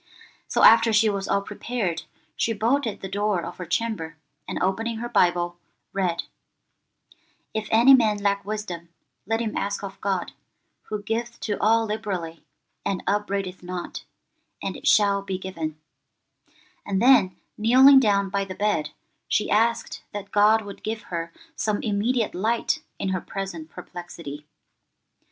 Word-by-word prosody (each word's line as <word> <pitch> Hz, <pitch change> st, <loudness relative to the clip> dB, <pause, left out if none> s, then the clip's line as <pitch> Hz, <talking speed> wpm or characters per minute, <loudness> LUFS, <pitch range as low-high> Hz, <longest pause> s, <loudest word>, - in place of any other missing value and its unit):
So -, -, +1 dB
after 230 Hz, 0 st, +8 dB
she 215 Hz, 0 st, +4 dB
was 195 Hz, -1 st, -3 dB
all 200 Hz, 0 st, +1 dB
prepared, 205 Hz, -5 st, -3 dB, 0.3 s
she 230 Hz, -, 0 dB
bolted 225 Hz, 0 st, 0 dB
the 190 Hz, -, -4 dB
door 205 Hz, -2 st, 0 dB
of 175 Hz, -, -8 dB
her 180 Hz, -, -6 dB
chamber, 165 Hz, -7 st, -2 dB, 0.3 s
and -, -, -4 dB
opening 225 Hz, +5 st, -1 dB
her 240 Hz, +2 st, -4 dB
Bible, 175 Hz, -5 st, +1 dB, 0.3 s
read, 180 Hz, -4 st, 0 dB, 1.3 s
'If 220 Hz, -1 st, -2 dB
any 235 Hz, +5 st, +7 dB
man 220 Hz, -5 st, +4 dB
lack 200 Hz, -1 st, 0 dB
wisdom, 190 Hz, -5 st, -5 dB, 0.4 s
let 225 Hz, +1 st, 0 dB
him 220 Hz, -2 st, -3 dB
ask 200 Hz, +1 st, -2 dB
of 195 Hz, -1 st, -8 dB
God, 190 Hz, -3 st, -1 dB, 0.6 s
who 210 Hz, -1 st, -3 dB
giveth 230 Hz, +2 st, -3 dB
to 210 Hz, -, -1 dB
all 225 Hz, +1 st, +4 dB
liberally 190 Hz, -7 st, -4 dB, 0.4 s
and 195 Hz, -, -2 dB
upbraideth 200 Hz, -2 st, -1 dB
not, 180 Hz, 0 st, -6 dB, 0.6 s
and -, -, -4 dB
it -, -, -6 dB
shall 200 Hz, -1 st, +4 dB
be 195 Hz, -1 st, -3 dB
given;' 165 Hz, -5 st, -5 dB, 1.0 s
and 195 Hz, -1 st, -1 dB
then 240 Hz, -6 st, +5 dB, 0.2 s
kneeling 260 Hz, +5 st, +7 dB
down 200 Hz, -5 st, +2 dB
by 200 Hz, 0 st, 0 dB
the 190 Hz, -1 st, -7 dB
bed, 205 Hz, -7 st, 0 dB, 0.4 s
she 210 Hz, -, 0 dB
asked 230 Hz, +2 st, +1 dB
that 200 Hz, -1 st, -6 dB
God 215 Hz, +2 st, +5 dB
would 200 Hz, -1 st, -9 dB
give 220 Hz, 0 st, -4 dB
her 170 Hz, 0 st, -3 dB, 0.2 s
some 215 Hz, -1 st, 0 dB
immediate 220 Hz, +2 st, 0 dB
light 230 Hz, -, 0 dB, 0.2 s
in 195 Hz, -, -2 dB
her 185 Hz, -2 st, -1 dB
present 185 Hz, -5 st, -6 dB
perplexity. 160 Hz, -5 st, -9 dB
200 Hz, 145 wpm, -25 LUFS, 185-220 Hz, 1.3 s, after